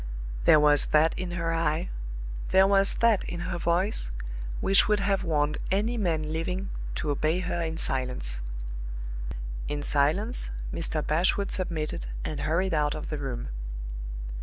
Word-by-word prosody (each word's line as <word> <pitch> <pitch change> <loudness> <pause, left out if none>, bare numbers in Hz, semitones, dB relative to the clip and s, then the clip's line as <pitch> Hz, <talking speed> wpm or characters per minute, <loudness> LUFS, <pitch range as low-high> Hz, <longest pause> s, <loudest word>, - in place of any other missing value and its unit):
There 155 - +8
was 150 -1 +7
that 155 +2 +4
in 185 -1 -4
her 165 -1 0
eye, 165 0 0 0.6
there 190 0 +6
was 195 0 +4
that 230 -4 +4
in 175 -1 -4
her 175 0 -3
voice, 175 - +2 0.5
which 195 +1 +4
would 210 0 +3
have 195 -1 +1
warned 150 -3 +1
any 210 +5 +1
man 160 -7 -1
living 180 +4 -2 0.2
to 150 - -1
obey 155 +5 +1
her 180 -1 -2
in 160 -1 -2
silence. 125 - -1 1.3
In 145 0 -3
silence 160 - +1 0.2
Mr. 160 -2 -1
Bashwood 185 +5 +2
submitted, 155 - 0 0.2
and 150 - -3
hurried 165 +6 0
out 150 -1 +1
of 155 - -5
the 150 - -2
room. 125 - -4
165 Hz, 145 wpm, -27 LUFS, 150-190 Hz, 1.3 s, There